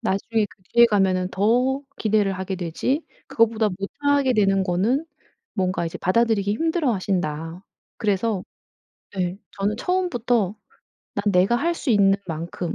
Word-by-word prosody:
나중에 215 +3 0
그 185 0 -22
뒤에 235 0 +7
가면은 190 -4 +1
더 250 +8 +1 0.2
기대를 210 -2 +2
하게 190 0 -4
되지 185 - -2 0.2
그거보다 225 -1 +2
못하게 280 +6 +1
되는 195 -3 +3
거는 210 - +1 0.5
뭔가 185 -3 0
이제 165 - -6
받아들이기 205 0 +2
힘들어하신다. 190 - -1 0.4
그래서 205 -1 0 0.7
네 180 0 -1 0.2
저는 205 +2 0
처음부터 245 - 0 0.6
"난 200 - -2
내가 185 +5 +4
할 335 +6 0
수 290 - -3
있는 195 -2 +5
만큼 170 +1 -4
205 Hz, 290 characters per minute, -23 LUFS, 185-235 Hz, 0.7 s, 뒤에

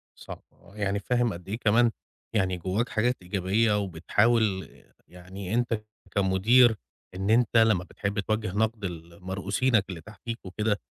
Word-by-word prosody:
صح، - - -10 0.3
يعني 100 -1 -1
فاهم 120 +1 0
قد 85 +2 -10
إيه 110 - -2
كمان 115 +1 +3 0.4
يعني 95 -3 +1
جواك 95 +7 -1
حاجات 120 +3 +1
إيجابية 100 +4 +1
وبتحاول 100 +3 +1 0.4
يعني 95 +3 -8
أنت 115 -2 0 0.3
كمدير 105 +5 +4 0.4
إن 95 +2 -2
أنت 115 0 +3
لمّا 110 -5 +4
بتحب 100 +3 -4
توجّه 110 0 -1
نقد 110 -1 0
لمرؤوسينك 95 +6 -1
اللي 90 -4 -6
تحتيك 110 +3 -8
وكده، 105 +2 -1
105 Hz, 130 wpm, -27 LUFS, 95-115 Hz, 0.4 s, كمدير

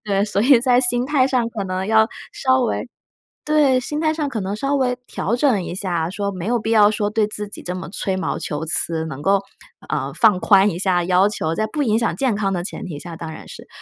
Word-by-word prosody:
对， 200 -2 0
所 205 -1 -1
以 260 +1 +6
在 250 0 +3
心 245 0 +2
态 275 -2 +3
上 245 -3 +1
可 220 -4 -4
能 185 0 -3
要 220 0 +4 0.2
稍 260 -1 +2
微 240 +2 -2 0.6
对， 295 -4 +3
心 295 +4 -4
态 315 -1 +1
上 305 -2 -2
可 230 -5 -3
能 195 +2 -3
稍 275 +6 -1
微 255 -2 +1
调 225 - -2
整 245 -7 +2
一 175 - -5
下， 175 -4 -1
说 200 +1 -3
没 185 -3 -6
有 240 +2 +1
必 220 - -4
要 210 -2 +5
说 210 -1 -1
对 215 0 +1
自 210 0 -5
己 205 - -9
这 180 - -4
么 180 -2 -7
吹 190 0 -2
毛 190 - -2
求 150 +1 -4
疵， 160 0 0
能 145 -2 -7
够， 195 0 +3 0.5
呃， - - -3
放 185 -4 +4
宽 195 +1 +5
一 170 - -4
下 180 -1 +1
要 185 +2 +3
求， 165 -6 -2
在 215 - 0
不 290 +8 -3
影 220 -6 +2
响 230 0 0
健 260 -6 0
康 200 -2 -1
的 175 -2 -2
前 185 - -6
提 150 -5 -6
下， 170 -2 -8
当 160 -1 -7
然 - - -11
是。 - - -11
210 Hz, 265 characters per minute, -20 LUFS, 185-245 Hz, 0.6 s, 以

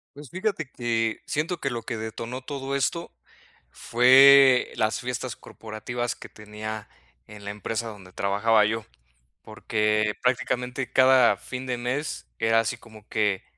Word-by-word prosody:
Pues, 145 -2 -11
fíjate 185 -6 -2
que, 115 -2 -1
siento 160 +3 -2
que 135 - -1
lo 120 -3 -5
que 115 - -4
detonó 115 +3 -6
todo 135 0 -5
esto, 170 +5 -2 0.6
fue 130 +2 +6
las 110 0 0
fiestas 125 -1 -4
corporativas 115 +2 -6
que - - -12
tenía 105 0 -8 0.4
en 105 -1 -12
la 100 - -4
empresa 115 +2 -4
donde 100 -4 -12
trabajaba 105 +2 +2
yo, 115 +1 -1 0.6
porque 105 -1 0
prácticamente 125 0 -1
cada 130 -5 +5
fin 130 +4 -7
de 125 - -2
mes 125 +5 -3
era 115 0 +3
así 115 +1 -2
como 110 -2 -16
que, 105 -3 0
115 Hz, 140 wpm, -25 LUFS, 110-130 Hz, 0.6 s, fue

